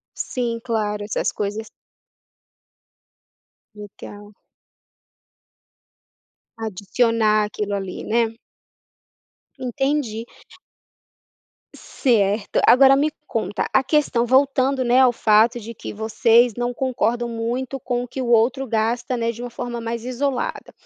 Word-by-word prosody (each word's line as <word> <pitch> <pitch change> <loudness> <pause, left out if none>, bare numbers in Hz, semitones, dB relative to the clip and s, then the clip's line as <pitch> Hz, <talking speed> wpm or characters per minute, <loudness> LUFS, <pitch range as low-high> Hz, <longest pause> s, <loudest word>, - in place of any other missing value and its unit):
Sim 235 -2 -3
claro, 210 -3 -2
essas 205 - -1
coisas 210 +2 -4 2.1
Legal. 205 0 -11 2.3
Adicionar 215 +1 +1
aquilo 210 -1 -3
ali, 190 -2 -5
né. 225 0 0 1.3
Entendi. 260 -3 -2 1.5
Certo, 210 -4 0
agora 270 +2 +7
me 295 +3 +1
conta, 215 -5 -2
a 270 - +4
questão 260 -4 +1
voltando, 265 0 +2
né, 245 +1 +3
ao 260 -2 +6
fato 225 +1 +3
de 230 +1 -8
que - - -8
vocês 225 +2 +3
não 245 +2 -2
concordam 240 -2 -1
muito 235 +3 -3
com 245 -1 -2
o - - -7
que 265 - -5
o 250 - -3
outro 240 +3 +2
gasta, 230 +2 -1
né, 230 0 0
de 235 +1 -10
uma 245 - -5
forma 240 0 -5
mais 230 0 -4
isolada. 255 +1 -3
235 Hz, 110 wpm, -21 LUFS, 220-255 Hz, 2.3 s, agora